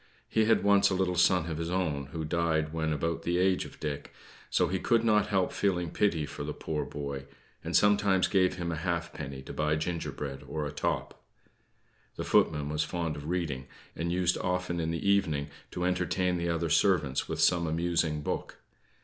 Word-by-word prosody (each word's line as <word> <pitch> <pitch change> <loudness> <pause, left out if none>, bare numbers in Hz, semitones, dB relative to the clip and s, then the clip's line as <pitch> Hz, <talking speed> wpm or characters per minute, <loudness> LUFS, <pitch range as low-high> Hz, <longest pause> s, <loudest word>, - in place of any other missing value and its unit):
He 110 -1 +2
had 115 +1 +3
once 100 -1 +5
a 95 - 0
little 90 -1 +1
son 90 -1 +4
of 80 - -3
his 85 0 -2
own, 80 -7 -1
who 80 +2 -5
died 80 -1 0
when 80 -1 -1
about 85 +2 -1
the 85 +1 0
age 95 0 +2
of - - -12
Dick; 75 -2 -4 0.4
so 90 - +2
he 95 +2 -1
could 115 +4 +2
not 105 -3 +3
help 95 -3 +1
feeling 90 -4 0
pity 85 -7 +1
for 70 +1 -6
the 75 +1 -4
poor 75 -2 -3
boy, 70 -1 -5 0.4
and - - -3
sometimes 100 -2 +4
gave 95 -2 +2
him 85 -2 -3
a 80 - -3
halfpenny 80 -5 -3
to - - -8
buy 75 0 +1
gingerbread 75 -4 -4
or 75 -1 -3
a 75 - -4
top. 75 - -2 0.9
The - - -4
footman 75 -2 +2
was 75 +1 0
fond 85 -3 -2
of 75 +2 -7
reading, 75 -7 -2 0.3
and 85 +1 -2
used 90 0 +1
often 90 -1 -1
in 80 -1 -1
the 85 +4 -2
evening 80 -8 +2 0.2
to 90 - -3
entertain 90 0 +1
the 85 0 -1
other 85 -1 -1
servants 80 -5 +2
with - - -3
some 85 -2 +3
amusing 80 -2 0
book. - - -3
85 Hz, 190 wpm, -29 LUFS, 75-90 Hz, 0.9 s, once